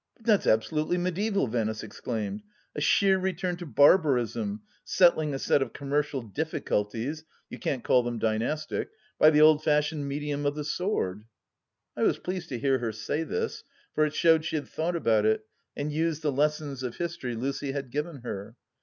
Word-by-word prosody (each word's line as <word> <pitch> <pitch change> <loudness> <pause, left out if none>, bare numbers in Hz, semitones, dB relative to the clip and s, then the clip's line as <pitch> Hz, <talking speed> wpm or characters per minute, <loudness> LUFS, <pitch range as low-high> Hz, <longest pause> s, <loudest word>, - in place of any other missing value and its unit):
" - - -58
But 225 - -23
that's 215 -4 +3
absolutely 155 +10 +2
mediaeval," 195 +3 0
Venice 110 -2 -2
exclaimed; 110 - -4 0.2
" - - -39
a 150 - -3
sheer 190 +5 +4
return 185 -1 -1
to 175 -1 -7
barbarism, 125 - +3 0.2
settling 160 -4 +3
a 135 - -2
set 140 - +2
of 135 - -2
commercial 140 -1 -1
diffi 155 +9 -3
culties 115 +9 -2
— - - -37
you - - -7
can't 130 -4 -2
call 125 - +4
them 120 -1 -3
dynastic 115 +8 -1 0.2
— 215 - -32
^by 155 - +8
the 150 0 +4
old 155 0 +6
fashioned 150 -1 +1
medium 145 +1 -3
of 145 - -1
the 150 - -3
sword! 145 - -2 0.3
" - - -59
I - - -4
was - - +3
pleased 180 -1 -5
to 125 - -3
hear 135 +1 +1
her 115 -2 -2
say 110 +8 -3
this, 450 - -3 0.3
for 155 - +2
it 155 0 -1
showed 160 -2 +4
she 160 - -3
had 150 - -2
thought 170 +2 -2
about 110 -9 +2
it 110 0 +1 0.3
and 145 +1 -2
used 160 0 -1
the 150 - +1
lessons 145 -1 -1
of 125 -2 -4
history 165 -8 -4
Lucy 135 +3 -3
had 135 -3 -5
given 150 0 -4
her. 110 -2 -6
145 Hz, 200 wpm, -28 LUFS, 120-160 Hz, 0.3 s, ^by